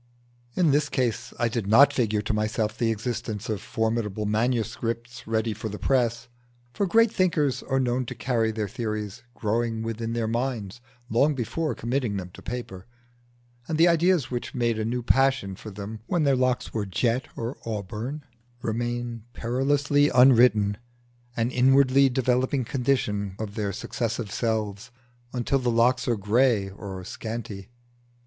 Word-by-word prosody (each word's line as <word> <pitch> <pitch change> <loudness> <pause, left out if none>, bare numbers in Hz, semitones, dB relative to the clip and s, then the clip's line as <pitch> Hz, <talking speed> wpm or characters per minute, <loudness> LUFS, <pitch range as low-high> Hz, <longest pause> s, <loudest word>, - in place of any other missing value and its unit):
In 170 -5 +3
this 145 +1 +2
case 125 -4 -1
I 120 - +1
did 115 -3 -2
not 140 +7 +7
figure 110 -5 +1
to 110 - -1
myself 105 0 -1
the 115 -1 0
existence 110 -1 -3
of 105 -3 -2
formidable 110 -2 -1
manuscripts 115 +1 -2
ready 110 0 0
for 110 +1 -5
the 105 - -6
press; 120 -2 +1 0.5
for 200 - 0
great 230 +4 +4
thinkers 155 -7 +1
are 135 -1 0
known 125 -1 0
to - - -5
carry 115 -3 0
their 110 -1 -2
theories 110 -2 -4
growing 115 +1 -1
within 115 0 -3
their 115 -1 -1
minds 120 -2 -3 0.3
long 140 +6 +2
before 135 +3 -2
committing 120 -3 -1
them 90 -2 -6
to - - -12
paper, 115 -6 -6 0.8
and 160 - -1
the 165 +2 +6
ideas 170 -4 +3
which 120 -1 -4
made 120 -2 +1
a 110 - -1
new 120 +2 -2
passion 130 -7 +2
for 110 - -9
them 105 +2 -7
when 170 -3 +1
their 140 -2 +4
locks 130 -1 0
were 105 -3 -2
jet 120 +6 0
or 115 +3 -4
auburn, 115 +7 -4 0.4
remain 120 +1 -2
perilously 145 +5 +2
unwritten, 120 -5 +5 0.6
an 115 +1 +1
inwardly 135 +1 +5
developing 130 +1 +1
condition 110 -7 -1
of 110 -2 -5
their 105 -2 -2
successive 115 +2 -3
selves, 110 -1 -2 0.4
until 130 +2 0
the 125 -1 0
locks 125 +2 +3
are 120 -2 +2
grey 105 0 +2
or 95 -2 -7
scanty. 105 -1 -6
115 Hz, 155 wpm, -26 LUFS, 110-130 Hz, 0.8 s, not